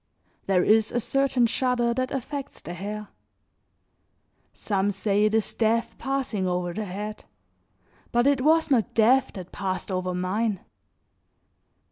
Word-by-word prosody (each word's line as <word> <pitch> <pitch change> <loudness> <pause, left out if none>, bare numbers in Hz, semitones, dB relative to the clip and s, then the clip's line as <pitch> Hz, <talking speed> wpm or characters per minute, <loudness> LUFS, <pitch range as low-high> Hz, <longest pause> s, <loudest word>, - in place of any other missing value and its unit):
There 185 -2 +3
is 220 0 +3
a 240 - 0
certain 260 0 +1
shudder 240 0 +1
that 255 +1 -1
affects 275 +1 -5
the 175 - -8
hair; 210 +4 -6 1.4
some 200 -1 -1
say 205 +1 +1
it 215 +1 +2
is 225 - 0
death 230 +1 +1
passing 265 -8 -1
over 180 -1 -1
the 215 +2 -3
head, 210 +3 -6 0.9
but 240 +1 +2
it 280 -2 +3
was 320 +2 +3
not 235 -5 +2
death 255 +4 +4
that 185 -2 -8
passed 190 -1 -3
over 185 -1 -2
mine. 195 +3 -1
215 Hz, 135 wpm, -25 LUFS, 195-250 Hz, 1.4 s, death